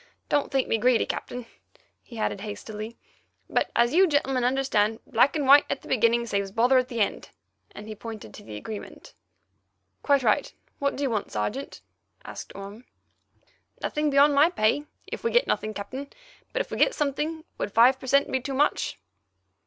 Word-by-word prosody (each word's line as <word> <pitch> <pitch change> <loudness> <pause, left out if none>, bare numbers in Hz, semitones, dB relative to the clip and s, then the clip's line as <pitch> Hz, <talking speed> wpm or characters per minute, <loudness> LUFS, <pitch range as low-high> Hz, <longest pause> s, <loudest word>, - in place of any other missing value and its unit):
Don't 290 - +1
think 270 -1 +1
me 225 - +1
greedy, 245 0 +3
Captain," 245 -1 -5 0.6
he 235 - -12
added 210 -2 -2
hastily, 215 +2 -7 0.5
"but, - - 0
as 235 +2 +3
you 375 +3 +6
gentlemen 270 -5 +1
understand, 245 -4 +1
black 280 - +3
and 295 -3 0
white 280 +2 +8
at 275 - -3
the - - -12
beginning 235 -1 +2
saves 200 -3 -1
bother 245 +5 +4
at 255 - -1
the 235 -3 -5
end"—and 210 0 -5
he 215 - -5
pointed 215 - -9
to - - -11
the 105 - -9
agreement. 205 - -8 0.9
"Quite 280 -2 +3
right. 215 -3 +2 0.3
What 280 0 0
do 285 - -3
you 270 - 0
want, 215 -3 -2
Sergeant?" 215 - -4 0.4
asked - - -8
Orme. 200 +5 -9 0.9
"Nothing 300 0 -1
beyond 285 +1 +5
my 290 +4 +5
pay, 290 -2 +1 0.2
if - - -7
we 465 - +1
get 485 +1 +3
nothing, 215 - -1
Captain, 255 +7 -6 0.4
but - - 0
if - - -7
we - - -3
get - - +4
something, 300 +2 -2 0.2
would - - -2
five 250 +4 +5
per 260 - -9
cent. 280 +2 +3
be 260 - +1
too 265 +1 -5
much?" 295 +2 +1
255 Hz, 180 wpm, -26 LUFS, 215-280 Hz, 0.9 s, white